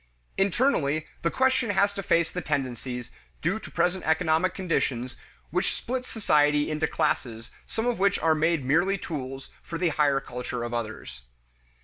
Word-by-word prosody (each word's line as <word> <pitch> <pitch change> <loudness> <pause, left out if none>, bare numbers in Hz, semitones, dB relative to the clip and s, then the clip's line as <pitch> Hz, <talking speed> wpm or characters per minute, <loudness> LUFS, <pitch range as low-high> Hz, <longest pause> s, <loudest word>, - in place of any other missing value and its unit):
Internally, 175 - +2 0.2
the 170 - +1
question 260 -1 +2
has 200 0 +3
to 200 - -4
face 170 -3 +2
the 180 - -3
tendencies, 125 -4 -3 0.3
due 185 +7 +1
to - - -10
present 180 +1 0
economic 160 +2 +2
conditions, 135 -9 -1 0.4
which - - 0
split 255 +1 -3
society 150 -8 +2
into 155 +1 0
classes 120 -7 -1 0.2
some 225 - -2
of 245 -4 0
which 200 +1 +3
are 160 -1 +3
made 160 -2 +1
merely 175 +8 +3
tools 135 -6 -6
for 165 - -5
the 175 0 +2
higher 145 -3 +2
culture 125 -2 -5
of 120 0 -4
others. 110 - -5
160 Hz, 155 wpm, -27 LUFS, 135-190 Hz, 0.4 s, has